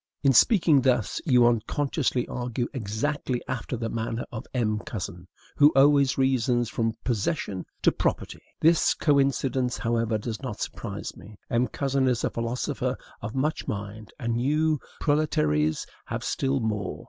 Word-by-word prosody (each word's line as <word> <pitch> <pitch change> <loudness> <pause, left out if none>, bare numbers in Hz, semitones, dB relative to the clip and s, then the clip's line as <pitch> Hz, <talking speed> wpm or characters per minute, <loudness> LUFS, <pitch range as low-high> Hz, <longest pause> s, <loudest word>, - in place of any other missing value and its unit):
In 135 -1 +5
speaking 165 - +5
thus, 125 -4 +1
you 125 -4 +5
unconsciously 125 +3 0
argue 120 0 -3
exactly 125 +3 -2
after 125 0 -3
the 115 0 -3
manner 115 +1 -3
of 110 - -7
M. 110 -4 0
Cousin, 95 - -6 0.3
who 145 +1 +7
always 140 0 +5
reasons 125 -3 +2
from 115 -1 -1
possession 105 - -2 0.2
to - - +5
PROPERTY. - - -2 0.2
This 165 +1 +4
coincidence, 135 -3 +1
however, 115 -1 0
does 110 +2 -5
not 125 -6 -5
surprise - - -5
me. 105 0 -13
M. 120 +2 +2
Cousin 135 +2 0
is 125 -2 +1
a - - 0
philosopher 115 +2 -2 0.2
of 110 - -6
much 150 +4 -1
mind, 105 +1 -5
and 120 0 -1
you, 155 +3 +2 0.2
proletaires, 80 - +1 0.2
have - - -4
still 135 0 0
more. 105 -4 -2
125 Hz, 145 wpm, -26 LUFS, 110-140 Hz, 0.3 s, who